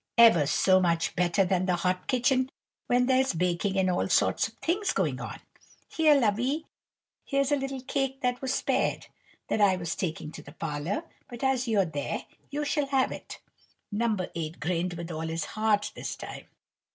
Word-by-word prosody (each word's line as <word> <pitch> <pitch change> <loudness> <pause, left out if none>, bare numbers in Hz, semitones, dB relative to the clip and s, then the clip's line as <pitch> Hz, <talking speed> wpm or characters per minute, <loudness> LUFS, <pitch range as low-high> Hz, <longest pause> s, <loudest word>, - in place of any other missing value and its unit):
Ever 225 -11 +7
so 185 +5 +4
much 170 -2 +1
better 180 +2 +2
than 185 0 +1
the 180 - +3
hot 180 +1 -1
kitchen, 255 0 +2 0.4
when 250 0 +3
there's 260 -4 +2
baking 180 +3 0
and 190 -1 +3
all 180 -1 +1
sorts - - +3
of - - -17
things 380 +5 0
going - - 0
on. - - -6 0.5
Here, 310 -2 +4
lovey! 255 +6 +1 0.6
here's 275 0 0
a - - +5
little 270 -1 -4
cake 270 0 -2
that 250 0 0
was 265 -1 -1
spared, - - 0 0.4
that 215 - 0
I 195 -2 +5
was 175 +1 -3
taking 160 -4 -3
to 155 - -9
the 145 -1 -13
parlour; 165 - -3 0.3
but, 240 +1 -8
as 265 -1 +1
you're 205 -4 +3
there, 145 -4 -4 0.2
you 295 +1 -2
shall 290 -1 0
have 270 -1 +2
it." - - -8 0.5
No. 220 +1 +1 0.2
8 160 -1 -5
grinned 175 +2 -1
with 170 0 -6
all 160 0 -4
his 165 0 -2
heart 215 -1 +1
this - - -5
time. - - -9
205 Hz, 180 wpm, -28 LUFS, 175-265 Hz, 0.6 s, Ever